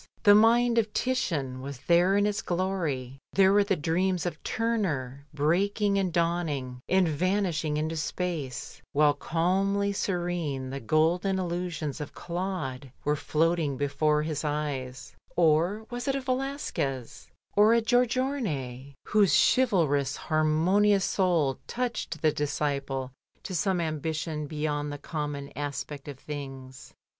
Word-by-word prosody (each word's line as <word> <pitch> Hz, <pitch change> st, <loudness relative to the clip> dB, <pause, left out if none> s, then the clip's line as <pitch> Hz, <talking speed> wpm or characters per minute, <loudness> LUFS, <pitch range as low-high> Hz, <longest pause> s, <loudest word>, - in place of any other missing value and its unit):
The 205 Hz, -, +8 dB
mind 230 Hz, +2 st, +5 dB
of 215 Hz, -2 st, -1 dB
Titian 150 Hz, -, -1 dB
was 135 Hz, -1 st, -7 dB
there 175 Hz, +3 st, +4 dB
in 205 Hz, -, +3 dB
its 210 Hz, +1 st, 0 dB
glory. 165 Hz, -8 st, -2 dB
There 195 Hz, 0 st, +5 dB
were 205 Hz, 0 st, +5 dB
the 200 Hz, -1 st, +1 dB
dreams 175 Hz, +3 st, 0 dB
of 170 Hz, -3 st, -4 dB
Turner 150 Hz, -, -2 dB
breaking 200 Hz, +7 st, +1 dB
and 185 Hz, -2 st, 0 dB
dawning, 160 Hz, -7 st, -1 dB
and 190 Hz, -1 st, +4 dB
vanishing 165 Hz, -2 st, 0 dB
into 155 Hz, +2 st, -1 dB
space, 155 Hz, -4 st, -4 dB
while 150 Hz, 0 st, +4 dB
calmly 195 Hz, +6 st, 0 dB
serene 175 Hz, -9 st, -2 dB
the 135 Hz, -, -4 dB
gol 155 Hz, +8 st, +2 dB
den 195 Hz, 0 st, -1 dB
illusions 175 Hz, -4 st, -3 dB
of 150 Hz, 0 st, -7 dB
Qaude 170 Hz, -8 st, -4 dB
were 150 Hz, +1 st, +1 dB
floating 155 Hz, -1 st, 0 dB
before 150 Hz, +2 st, +1 dB
his 155 Hz, -1 st, -3 dB
eyes; 135 Hz, -4 st, -3 dB, 0.2 s
or 175 Hz, +6 st, +2 dB
was 245 Hz, +2 st, -4 dB
it 275 Hz, -, +1 dB
a 275 Hz, -, -1 dB
Velasquez 255 Hz, -, -3 dB, 0.3 s
or 215 Hz, +3 st, +6 dB
a -, -, +5 dB
Giorgione 225 Hz, -, 0 dB
whose 210 Hz, -3 st, +4 dB, 0.2 s
chivalrous, 150 Hz, -, +2 dB
harmonious 175 Hz, +6 st, +2 dB
soul 170 Hz, -8 st, +1 dB
touched 235 Hz, -, -3 dB
the 155 Hz, -, +5 dB
disciple 140 Hz, -3 st, -2 dB, 0.3 s
to 190 Hz, -, -6 dB
some 185 Hz, +1 st, +1 dB
ambition 155 Hz, -1 st, -2 dB
beyond 150 Hz, -1 st, -2 dB
the 145 Hz, -, -5 dB
common 145 Hz, -2 st, -5 dB
aspect 145 Hz, 0 st, -5 dB
of 140 Hz, -3 st, -7 dB
things? 135 Hz, -3 st, -8 dB
160 Hz, 130 wpm, -28 LUFS, 145-195 Hz, 0.3 s, The